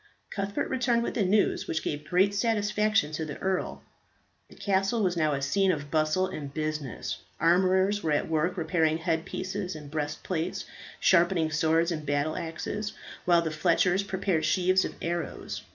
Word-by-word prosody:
Cuthbert 200 Hz, 0 st, -2 dB
returned 245 Hz, -2 st, +1 dB
with -, -, -2 dB
the 215 Hz, -, +1 dB
news, 200 Hz, +3 st, +2 dB
which 160 Hz, -, -2 dB
gave 150 Hz, 0 st, -4 dB
great 190 Hz, +3 st, +3 dB
satisfaction 210 Hz, -4 st, +1 dB
to 155 Hz, +1 st, -3 dB
the 150 Hz, -2 st, -5 dB
earl. 190 Hz, -1 st, -2 dB, 0.7 s
The -, -, -15 dB
castle 195 Hz, +3 st, +1 dB
was 180 Hz, -2 st, +1 dB
now 155 Hz, -3 st, +2 dB
a 140 Hz, -1 st, -2 dB
scene 195 Hz, +6 st, +2 dB
of 145 Hz, -4 st, -4 dB
bustle 155 Hz, +4 st, +2 dB
and 155 Hz, -7 st, -6 dB
business; 140 Hz, -11 st, -3 dB, 0.2 s
armourers 190 Hz, +4 st, +3 dB
were 160 Hz, -, -1 dB
at 145 Hz, -, +1 dB
work 160 Hz, +4 st, 0 dB
repairing 160 Hz, -1 st, +1 dB
head 165 Hz, 0 st, -1 dB
pieces 185 Hz, -1 st, -4 dB
and 150 Hz, -2 st, -9 dB
breastplates, 160 Hz, +3 st, -3 dB, 0.3 s
sharpening 170 Hz, -3 st, +3 dB
swords 160 Hz, +2 st, +2 dB
and 155 Hz, -2 st, -3 dB
battle 145 Hz, +1 st, 0 dB
axes, 205 Hz, +5 st, -4 dB, 0.3 s
while 170 Hz, -1 st, +4 dB
the 160 Hz, -, -2 dB
fletchers 175 Hz, +4 st, +2 dB
prepared 190 Hz, -4 st, -1 dB
sheaves 185 Hz, 0 st, +3 dB
of -, -, -6 dB
arrows. 170 Hz, 0 st, -3 dB
170 Hz, 165 wpm, -28 LUFS, 155-190 Hz, 0.7 s, while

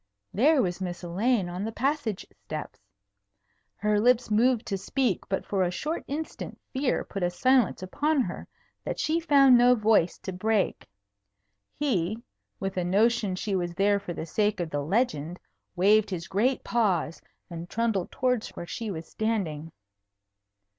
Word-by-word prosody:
There 280 Hz, +6 st, +4 dB
was 180 Hz, 0 st, -3 dB
Miss 180 Hz, -1 st, -4 dB
Elaine 195 Hz, +4 st, +1 dB
on 180 Hz, +2 st, -4 dB
the 220 Hz, -, -3 dB
passage 260 Hz, -4 st, -1 dB
steps. -, -, -8 dB, 1.0 s
Her 210 Hz, 0 st, +1 dB
lips 245 Hz, 0 st, +3 dB
moved 235 Hz, +2 st, +3 dB
to 195 Hz, -, -2 dB
speak, 245 Hz, 0 st, -1 dB
but 190 Hz, -, -1 dB
for 195 Hz, -2 st, -1 dB
a 180 Hz, -, +2 dB
short 300 Hz, -, -3 dB
instant 310 Hz, +3 st, -5 dB
fear 265 Hz, -1 st, 0 dB
put 195 Hz, -, -6 dB
a 175 Hz, -, +2 dB
silence 245 Hz, +1 st, +2 dB
upon 290 Hz, +9 st, +1 dB
her 185 Hz, -7 st, -5 dB, 0.4 s
that -, -, -4 dB
she 320 Hz, +2 st, +1 dB
found 280 Hz, -5 st, +6 dB
no 245 Hz, +1 st, +6 dB
voice 215 Hz, -6 st, +2 dB
to 190 Hz, -, -6 dB
break. 210 Hz, +2 st, 0 dB, 0.9 s
He, 215 Hz, -, 0 dB, 0.4 s
with 195 Hz, -1 st, -4 dB
a 180 Hz, -, +1 dB
notion 205 Hz, +2 st, +2 dB
she 195 Hz, +2 st, -2 dB
was 175 Hz, -2 st, -2 dB
there 200 Hz, +1 st, +3 dB
for 195 Hz, -3 st, -6 dB
the 160 Hz, -, -5 dB
sake 210 Hz, +4 st, 0 dB
of 170 Hz, -2 st, -3 dB
the 145 Hz, -, -1 dB
legend, 170 Hz, -, -1 dB, 0.4 s
waved 205 Hz, +4 st, +4 dB
his 175 Hz, -2 st, -4 dB
great 235 Hz, +8 st, +1 dB
paws 190 Hz, -9 st, 0 dB, 0.3 s
and 170 Hz, 0 st, -8 dB
trundled 225 Hz, -5 st, -1 dB
towards 250 Hz, -3 st, 0 dB
where -, -, -6 dB
she 225 Hz, +5 st, -5 dB
was 165 Hz, -4 st, -6 dB
standing. 175 Hz, -9 st, -2 dB
205 Hz, 160 wpm, -27 LUFS, 180-245 Hz, 1.0 s, found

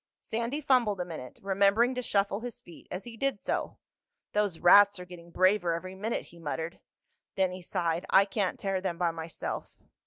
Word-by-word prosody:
Sandy 235 Hz, +6 st, -3 dB
fumbled 245 Hz, -8 st, +2 dB
a 180 Hz, -, -1 dB
minute, 155 Hz, -8 st, -8 dB
remembering 200 Hz, +5 st, +3 dB
to 250 Hz, -, -2 dB
shuffle 200 Hz, -3 st, 0 dB
his 240 Hz, 0 st, -6 dB
feet 170 Hz, -, -15 dB
as 180 Hz, +2 st, -5 dB
he 240 Hz, -1 st, -9 dB
did 275 Hz, 0 st, 0 dB
so. -, -, -3 dB, 0.6 s
"Those 205 Hz, -5 st, +1 dB
rats 200 Hz, +4 st, +7 dB
are 180 Hz, -, -8 dB
getting 175 Hz, -1 st, -12 dB
braver 185 Hz, 0 st, +3 dB
every 185 Hz, +2 st, -6 dB
minute," 210 Hz, +5 st, -3 dB
he 170 Hz, -, -16 dB
muttered. 165 Hz, +1 st, -4 dB, 0.6 s
Then 190 Hz, -1 st, +2 dB
he 185 Hz, 0 st, -7 dB
sighed. 170 Hz, 0 st, -2 dB
"I 195 Hz, +1 st, +6 dB
can't 200 Hz, -2 st, -2 dB
tear 195 Hz, -1 st, -1 dB
them 175 Hz, -3 st, -2 dB
by 175 Hz, -1 st, +1 dB
myself." 165 Hz, 0 st, -6 dB
190 Hz, 185 wpm, -29 LUFS, 175-210 Hz, 0.6 s, rats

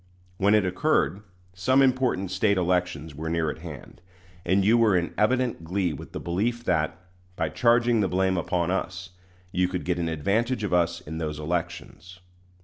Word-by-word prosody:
When 100 Hz, +2 st, +4 dB
it 105 Hz, -3 st, +3 dB
occurred, 90 Hz, +2 st, +1 dB, 0.3 s
some 130 Hz, +9 st, +3 dB
important 125 Hz, -8 st, +1 dB
State 100 Hz, +1 st, +2 dB
elections 90 Hz, -4 st, -1 dB
were 80 Hz, +2 st, -5 dB
near 80 Hz, -2 st, 0 dB
at -, -, -10 dB
hand, 80 Hz, +1 st, -10 dB, 0.4 s
and 95 Hz, +2 st, +2 dB
you 110 Hz, +3 st, +5 dB
were 115 Hz, -4 st, +4 dB
in 85 Hz, -1 st, -2 dB
evident 125 Hz, -4 st, +1 dB
glee 90 Hz, 0 st, -1 dB
with 70 Hz, -, -9 dB
the -, -, -5 dB
belief 115 Hz, +7 st, -2 dB
that, 80 Hz, -7 st, 0 dB, 0.4 s
by 80 Hz, -, -1 dB
charging 120 Hz, +4 st, +3 dB
the 100 Hz, -, +2 dB
blame 95 Hz, +1 st, +1 dB
upon 85 Hz, 0 st, -1 dB
us, 95 Hz, 0 st, -3 dB, 0.4 s
you 90 Hz, 0 st, +1 dB
could 90 Hz, -1 st, -4 dB
get 90 Hz, -1 st, 0 dB
an 85 Hz, -1 st, -1 dB
advantage 105 Hz, -, 0 dB
of 100 Hz, -, -2 dB
us 85 Hz, 0 st, +1 dB
in 80 Hz, -1 st, -7 dB
those 75 Hz, -2 st, -3 dB
elections. 85 Hz, +2 st, -5 dB
90 Hz, 175 wpm, -26 LUFS, 85-105 Hz, 0.4 s, you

